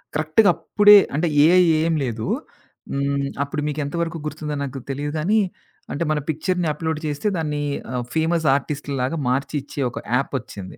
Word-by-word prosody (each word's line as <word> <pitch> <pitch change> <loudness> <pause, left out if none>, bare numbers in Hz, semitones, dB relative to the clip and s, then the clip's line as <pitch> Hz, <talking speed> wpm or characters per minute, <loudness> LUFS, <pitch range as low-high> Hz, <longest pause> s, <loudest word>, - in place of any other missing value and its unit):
కరెక్ట్‌గా 155 +7 +3
అప్పుడే 210 0 +6 0.2
అంటే 170 +3 +1 0.2
ఏఐ 180 +3 +6 0.2
ఏం 165 0 +1
లేదు. 115 -3 -3 0.6
హ్మ్. 140 0 -1 0.2
అప్పుడు 150 +1 -4
మీకెంతవరకు 155 +3 -2
గుర్తుందో 150 -1 -4
నాకు 135 0 -5
తెలీదు 145 +2 -3
గానీ 210 +8 +2 0.5
అంటే 160 - -1
మన 150 - +1
పిక్చర్‌ని 175 +2 0
అప్‌లోడ్ 160 0 -3
చేస్తే 145 +7 -2
దాన్ని 150 -2 -2 0.3
ఆహ్, 125 -1 -2
ఫేమస్ 160 0 +1
ఆర్టిస్ట్‌లాగా 140 0 -2
మార్చి 140 +3 -1
ఇచ్చే 140 0 -6
ఒక - - -6
యాప్ 135 +2 -1
ఒచ్చింది. 100 -4 -10
150 Hz, 150 wpm, -22 LUFS, 140-165 Hz, 0.6 s, అప్పుడే